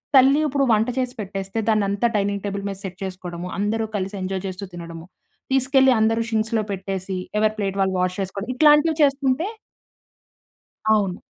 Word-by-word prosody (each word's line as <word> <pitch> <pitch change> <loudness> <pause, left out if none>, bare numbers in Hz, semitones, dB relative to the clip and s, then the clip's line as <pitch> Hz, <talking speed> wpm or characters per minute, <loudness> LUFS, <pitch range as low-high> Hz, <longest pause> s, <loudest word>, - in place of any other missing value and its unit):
తల్లి 270 +2 +6
ఇప్పుడు 275 0 +1
వంట 220 +2 +3
చేసి 250 -1 -1
పెట్టేస్తే 195 +1 -4
దాన్ని 215 -2 +3
అంతా 200 +4 +1
డైనింగ్ 200 -1 0
టేబుల్ 200 0 -3
మీద 195 - -4
సెట్ 185 -1 -6
చేసుకోవడము, 180 -2 -6
అందరూ 220 +2 0
కలిసి 195 +1 -3
ఎంజాయ్ 190 0 -3
చేస్తూ 190 +2 -6
తినడము, 170 -1 -8 0.5
తీసుకెళ్లి 265 0 +4
అందరూ 225 +1 +2
షింక్స్‌లో 220 0 0
పెట్టేసి 190 0 -4 0.2
ఎవరి 215 0 +2
ప్లేట్ 195 -2 -2
వాళ్ళు 190 -1 +1
వాష్ 185 +1 0
చేసుకోవడం 195 +4 -4
ఇట్లాంటివి 300 +2 +5
చేసుకుంటే 275 +4 +2 1.5
అవును. 195 -4 0
205 Hz, 155 wpm, -22 LUFS, 190-250 Hz, 1.5 s, తల్లి